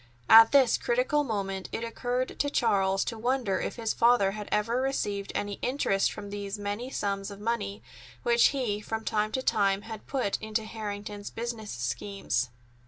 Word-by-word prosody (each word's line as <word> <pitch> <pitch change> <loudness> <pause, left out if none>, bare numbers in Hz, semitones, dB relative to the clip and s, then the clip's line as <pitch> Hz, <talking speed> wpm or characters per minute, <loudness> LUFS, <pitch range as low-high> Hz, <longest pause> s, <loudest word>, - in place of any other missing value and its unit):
At 225 0 +10
this 270 -4 +5
critical 255 +5 +1
moment 195 -6 -3
it 230 - -3
occurred 245 +2 -2
to 285 - +1
Charles 195 -7 +2
to 225 -2 -4
wonder 240 -5 0
if - - -3
his 225 -2 -1
father 235 -5 +4
had 210 0 -7
ever 230 +4 +1
received 205 -7 -2
any 205 -1 -2
interest 245 -7 +1
from 200 -1 -8
these 200 0 -4
many 205 +5 -4
sums 200 -5 -2
of 200 -1 -9
money 115 - -2 0.4
which 235 0 +5
he 240 -7 -1
from 220 +1 -4
time 215 0 0
to 260 - -1
time 200 -4 +2
had 220 -2 -9
put 255 -8 -1
into 220 0 -2
Harrington's 205 -2 -6
business 230 -2 -5
schemes. 120 +1 -2
215 Hz, 170 wpm, -28 LUFS, 200-235 Hz, 0.4 s, At